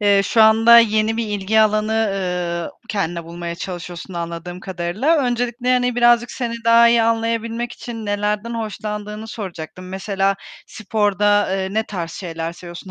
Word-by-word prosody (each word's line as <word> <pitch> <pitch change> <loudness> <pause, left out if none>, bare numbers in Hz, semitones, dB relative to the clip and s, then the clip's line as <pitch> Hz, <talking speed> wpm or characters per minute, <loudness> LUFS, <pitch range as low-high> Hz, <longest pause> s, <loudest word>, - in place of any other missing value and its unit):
Eee, 200 -1 +4
şu 220 +3 +4
anda 225 +2 +7
yeni 220 0 +2
bir 230 -1 -1
ilgi 205 +2 +1
alanı, 215 0 +2 0.2
ııı, 180 -3 -2 0.2
kendine 175 -5 -2
bulmaya 170 0 -6
çalışıyorsun 175 0 -7
anladığım 170 +1 -5
kadarıyla. 190 - 0
Öncelikle, 245 0 0
hani, 250 -1 +1
birazcık 240 0 +4
seni 235 -2 -3
daha 230 0 +6
iyi 235 0 +4
anlayabilmek 230 +1 -1
için 225 -3 -7
nelerden 210 +3 -1
hoşlandığını 210 -1 -5
soracaktım. 185 -4 -7
Mesela 195 +1 -1 0.3
sporda, 205 -2 +1
eee, 190 0 -1
ne 220 - +2
tarz 175 -6 -5
şeyler 165 -2 -5
seviyorsun? 175 +1 -10
210 Hz, 145 wpm, -20 LUFS, 180-230 Hz, 0.3 s, anda